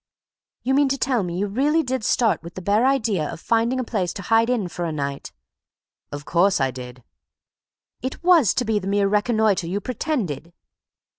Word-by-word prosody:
"You 265 Hz, -, +1 dB
mean 280 Hz, 0 st, +3 dB
to 275 Hz, -, 0 dB
tell 255 Hz, -3 st, +1 dB
me 175 Hz, -2 st, -4 dB
you 200 Hz, -, 0 dB
really 285 Hz, +10 st, +1 dB
did 260 Hz, -3 st, -3 dB
start 225 Hz, 0 st, +2 dB
with 170 Hz, 0 st, -11 dB
the 185 Hz, -, -6 dB
bare 210 Hz, +6 st, +3 dB
idea 215 Hz, -, 0 dB
of 165 Hz, -, -8 dB
finding 230 Hz, +6 st, +1 dB
a -, -, 0 dB
place 190 Hz, -7 st, -2 dB
to 200 Hz, -, -7 dB
hide 225 Hz, +3 st, +3 dB
in 235 Hz, -7 st, 0 dB
for 175 Hz, 0 st, -6 dB
a 165 Hz, -, -2 dB
night?" 140 Hz, -2 st, -4 dB, 0.8 s
"Of 145 Hz, +1 st, -7 dB
course 185 Hz, +2 st, +2 dB
I 135 Hz, -1 st, +1 dB
did." 125 Hz, -1 st, -10 dB, 1.0 s
"It 260 Hz, +6 st, -5 dB
was 335 Hz, -, +5 dB
to 245 Hz, -, 0 dB
be 220 Hz, -1 st, +1 dB
the 190 Hz, -, -7 dB
mere 200 Hz, 0 st, +2 dB
reconnoitre 210 Hz, -3 st, +1 dB
you 190 Hz, +4 st, -2 dB
pretended?" 205 Hz, -, -3 dB
205 Hz, 195 wpm, -22 LUFS, 175-250 Hz, 1.0 s, was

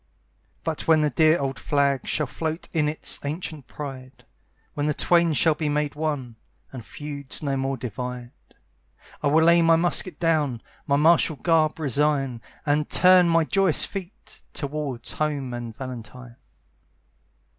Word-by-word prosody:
But 160 Hz, -2 st, -3 dB
when 160 Hz, -1 st, +5 dB
the 150 Hz, -1 st, +1 dB
dear 155 Hz, +5 st, +4 dB
old 135 Hz, -3 st, -3 dB
flag 140 Hz, -3 st, 0 dB
Shall 150 Hz, -, 0 dB
float 160 Hz, +4 st, -4 dB
in 150 Hz, -3 st, +1 dB
its 155 Hz, -, -2 dB
ancient 150 Hz, -2 st, -5 dB
pride, 130 Hz, -3 st, -9 dB, 0.5 s
When 145 Hz, 0 st, -2 dB
the 150 Hz, -, 0 dB
twain 170 Hz, -2 st, +3 dB
shall 160 Hz, +2 st, +3 dB
be 155 Hz, 0 st, -3 dB
made 150 Hz, 0 st, -1 dB
one, 145 Hz, -6 st, -4 dB, 0.4 s
And 125 Hz, -3 st, -7 dB
feuds 145 Hz, +2 st, -5 dB
no 140 Hz, -2 st, -1 dB
more 135 Hz, 0 st, -2 dB
divide, 125 Hz, +1 st, -6 dB, 0.9 s
I -, -, 0 dB
will 155 Hz, +3 st, +4 dB
lay 170 Hz, 0 st, +6 dB
my 165 Hz, 0 st, +5 dB
musket 175 Hz, 0 st, 0 dB
down, 150 Hz, -8 st, 0 dB, 0.2 s
My 140 Hz, -, +3 dB
martial 160 Hz, +1 st, +4 dB
garb 160 Hz, 0 st, +1 dB
resign, 140 Hz, -3 st, 0 dB, 0.2 s
And 150 Hz, 0 st, +1 dB
turn 180 Hz, -1 st, +5 dB
my 165 Hz, 0 st, +3 dB
joyous 190 Hz, -2 st, +3 dB
feet 195 Hz, 0 st, -9 dB
Toward 140 Hz, -4 st, -4 dB
home 145 Hz, -5 st, -2 dB
and 120 Hz, -2 st, -7 dB
Valentine. 125 Hz, -1 st, -9 dB
150 Hz, 145 wpm, -24 LUFS, 130-160 Hz, 0.9 s, lay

